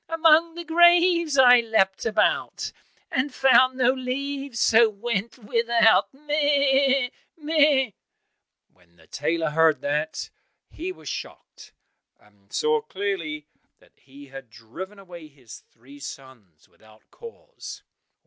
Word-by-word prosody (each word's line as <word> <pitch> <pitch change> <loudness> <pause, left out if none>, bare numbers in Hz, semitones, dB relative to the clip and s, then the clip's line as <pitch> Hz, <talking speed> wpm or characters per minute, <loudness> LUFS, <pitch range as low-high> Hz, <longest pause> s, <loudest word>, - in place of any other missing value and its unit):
Among 330 0 +3
the 345 - -7
graves 340 -2 +3
I 250 -2 +7
leapt 220 -3 0
about, 215 -1 -1 0.4
And 275 +2 -1
found 255 0 +3
no 250 -1 +3
leaves, 270 0 -5
so 225 0 +4
went 215 +2 -4
without, 230 -3 +2
meh! 280 -2 +1 0.3
meh!" 295 -5 +2 0.8
When 85 -1 -30
the 80 -1 -22
tailor 160 - -2
heard 160 0 +2
that, 150 +2 -3 0.4
he 355 +4 -6
was 365 - -14
shocked, - - -9 0.5
and 100 -1 -29
saw 460 0 0
clearly 185 - -5 0.3
that - - -27
he 140 +2 -16
had 135 -2 -11
driven 125 - -11
away 175 -5 -12
his 135 -6 -15
three 135 +5 -17
sons 125 - -12
without 110 0 -23
cause. 470 +1 -12
230 Hz, 120 wpm, -23 LUFS, -, 0.8 s, I